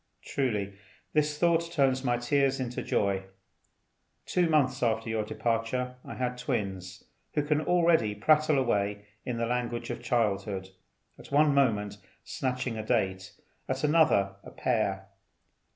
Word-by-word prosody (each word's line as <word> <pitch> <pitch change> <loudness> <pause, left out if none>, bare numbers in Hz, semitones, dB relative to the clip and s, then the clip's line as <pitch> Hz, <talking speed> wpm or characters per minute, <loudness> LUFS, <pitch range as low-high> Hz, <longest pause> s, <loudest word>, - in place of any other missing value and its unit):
Truly 105 -8 -1 0.4
this 150 -1 +1
thought 170 0 +2
turns 135 -4 +2
my 120 -2 +1
tears 135 +2 +1
into 125 -1 -3
joy. 100 -1 0 1.0
Two 175 -2 +1
months 135 -5 +2
after 115 -1 0
your 110 -1 0
departure 120 +3 -2
I - - -8
had 125 -1 -2
twins, 100 -7 -3 0.3
who 150 - +2
can 150 +1 +1
already 165 -11 +3
prattle 150 +7 +3
away 105 -5 0 0.2
in 125 -2 -2
the 115 - 0
language 120 0 -2
of - - -6
childhood, 100 -5 -1 0.5
at - - -13
one 145 +1 +4
moment 105 -7 +1 0.2
snatching 125 -3 -3
a - - -3
date, 95 -5 -1 0.4
at 130 +1 -2
another 150 -11 +3
a - - -10
pear. 100 -6 -1
125 Hz, 135 wpm, -29 LUFS, 105-140 Hz, 1.0 s, one